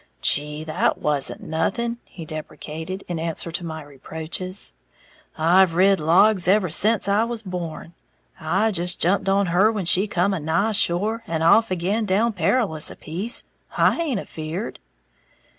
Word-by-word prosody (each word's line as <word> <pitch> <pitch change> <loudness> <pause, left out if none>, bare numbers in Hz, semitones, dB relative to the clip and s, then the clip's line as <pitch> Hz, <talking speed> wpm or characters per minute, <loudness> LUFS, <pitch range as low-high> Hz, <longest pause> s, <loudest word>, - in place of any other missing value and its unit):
"Gee, 150 +1 +2
that 155 -1 0
wasn't 145 -2 -1
nothing," 230 +9 -2
he 165 - -10
deprecated, 155 +4 -7
in 175 -2 -4
answer 165 +1 -3
to 175 +2 -3
my 160 -2 -6
reproaches, 160 +6 -4 0.6
"I've 170 +2 +4
rid 195 +2 +4
logs 180 +4 +4
ever 190 -3 +3
sence 215 +4 +3
I 205 +2 +3
was 230 -1 -4
born. 175 -3 -6 0.5
I 190 +8 +1
just 175 -1 -1
jumped 195 +2 +1
on 200 +1 +2
her 200 +5 +4
when 205 -5 -3
she 185 +4 +4
come 195 +1 0
a 190 - -2
nigh 165 +8 0
shore, 210 +3 +1
and 165 -1 -2
off 220 +7 +5
again 190 +5 -1
down 220 +5 +1
Perilous 180 -3 0
a - - -9
piece. 190 +10 -3 0.3
I - - +4
haint 305 -10 -1
afeared!" 165 +5 -6
180 Hz, 155 wpm, -22 LUFS, 160-205 Hz, 0.6 s, off